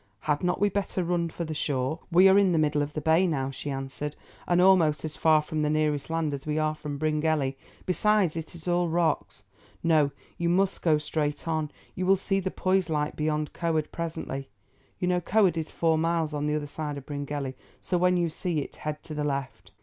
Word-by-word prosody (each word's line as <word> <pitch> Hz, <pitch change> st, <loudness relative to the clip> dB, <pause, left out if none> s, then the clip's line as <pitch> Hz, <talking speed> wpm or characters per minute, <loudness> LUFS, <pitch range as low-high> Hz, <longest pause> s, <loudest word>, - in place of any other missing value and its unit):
Had 150 Hz, +1 st, 0 dB
not 180 Hz, 0 st, +1 dB
we 205 Hz, -, +4 dB
better 195 Hz, -2 st, -1 dB
run 170 Hz, -1 st, 0 dB
for 170 Hz, +1 st, -5 dB
the 155 Hz, -, -4 dB
shore?" 145 Hz, 0 st, -1 dB
"We 180 Hz, +3 st, +7 dB
are 190 Hz, +1 st, +7 dB
in 190 Hz, -3 st, +3 dB
the -, -, +2 dB
middle 150 Hz, -1 st, +2 dB
of 145 Hz, +1 st, -3 dB
the 155 Hz, -, -3 dB
bay 160 Hz, +5 st, +4 dB
now," 135 Hz, -5 st, -1 dB
she 140 Hz, +2 st, -6 dB
answered, 135 Hz, +2 st, -4 dB, 0.3 s
"and 175 Hz, 0 st, +3 dB
almost 175 Hz, -5 st, +4 dB
as 155 Hz, -, -5 dB
far 155 Hz, -1 st, +4 dB
from 155 Hz, 0 st, -3 dB
the 150 Hz, -, +1 dB
nearest 150 Hz, -1 st, 0 dB
land 165 Hz, -2 st, 0 dB
as 140 Hz, +1 st, -6 dB
we 150 Hz, 0 st, 0 dB
are 155 Hz, 0 st, +1 dB
from 150 Hz, -2 st, -6 dB
Bryngelly, 155 Hz, -2 st, 0 dB, 0.3 s
besides 195 Hz, -2 st, +2 dB
it 165 Hz, +1 st, -6 dB
is 165 Hz, 0 st, -11 dB
all 175 Hz, -1 st, +2 dB
rocks. 160 Hz, -10 st, 0 dB, 0.4 s
No, 155 Hz, -4 st, +4 dB, 0.3 s
you 170 Hz, 0 st, +1 dB
must 190 Hz, +2 st, +1 dB
go 160 Hz, -3 st, +4 dB
straight 150 Hz, 0 st, -2 dB
on. 155 Hz, -2 st, 0 dB, 0.2 s
You 185 Hz, 0 st, -2 dB
will 195 Hz, -, +6 dB
see 195 Hz, +1 st, 0 dB
the 190 Hz, 0 st, -2 dB
Poise 185 Hz, -2 st, +1 dB
light 150 Hz, -1 st, -1 dB
beyond 150 Hz, -1 st, -1 dB
Coed 160 Hz, -3 st, -1 dB
presently. 160 Hz, -6 st, -4 dB, 0.5 s
You 180 Hz, -, -1 dB
know 180 Hz, 0 st, +2 dB
Coed 195 Hz, -2 st, +3 dB
is 160 Hz, -1 st, -3 dB
four 160 Hz, -1 st, +1 dB
miles 165 Hz, -1 st, 0 dB
on 150 Hz, 0 st, -1 dB
the 150 Hz, -, +1 dB
other 150 Hz, -1 st, -2 dB
side 145 Hz, 0 st, -5 dB
of 135 Hz, -, -9 dB
Bryngelly, 145 Hz, -2 st, -4 dB, 0.3 s
so 180 Hz, -, -1 dB
when 180 Hz, 0 st, +3 dB
you 175 Hz, -1 st, +2 dB
see 170 Hz, +1 st, -3 dB
it -, -, -8 dB
head 150 Hz, 0 st, -5 dB
to 155 Hz, -, -8 dB
the 150 Hz, 0 st, -2 dB
left." 140 Hz, -3 st, -3 dB
155 Hz, 220 wpm, -27 LUFS, 150-175 Hz, 0.5 s, We